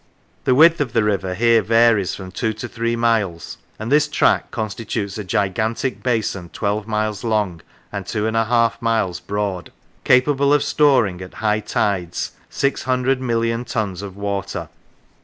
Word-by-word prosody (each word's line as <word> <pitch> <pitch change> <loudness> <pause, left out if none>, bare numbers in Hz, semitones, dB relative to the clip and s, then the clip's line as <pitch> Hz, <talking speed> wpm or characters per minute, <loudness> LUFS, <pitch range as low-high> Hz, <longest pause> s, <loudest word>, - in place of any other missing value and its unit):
The 130 - +4
width 165 +3 +6
of 125 -6 -2
the 115 - +3
river 95 -3 -1
here 115 +2 +4
varies 115 -3 +3
from 95 -1 -9
two 110 +4 -1
to 110 +3 -6
three 115 0 -2
miles, 110 -8 -1 0.2
and 110 +3 -5
this 150 +1 +4
track - - +2
constitutes 110 -2 -4
a - - -3
gigantic 110 +7 -1
basin 110 -7 -1
twelve 105 +2 -2
miles 105 -1 -2
long 105 -7 -1 0.3
and 100 -2 -4
two 105 +3 -2
and 110 0 -1
a 115 0 +2
half 115 0 +1
miles 115 -6 0
broad, 100 -4 -3 0.3
capable 140 +2 +4
of 145 - +2
storing 125 -12 +2
at 95 - -10
high 105 -1 +1
tides 95 -5 -1 0.2
600,000,000 125 -3 0
tons 100 -6 -2
of 100 -1 -8
water. 100 -4 -3
110 Hz, 155 wpm, -20 LUFS, 100-120 Hz, 0.3 s, width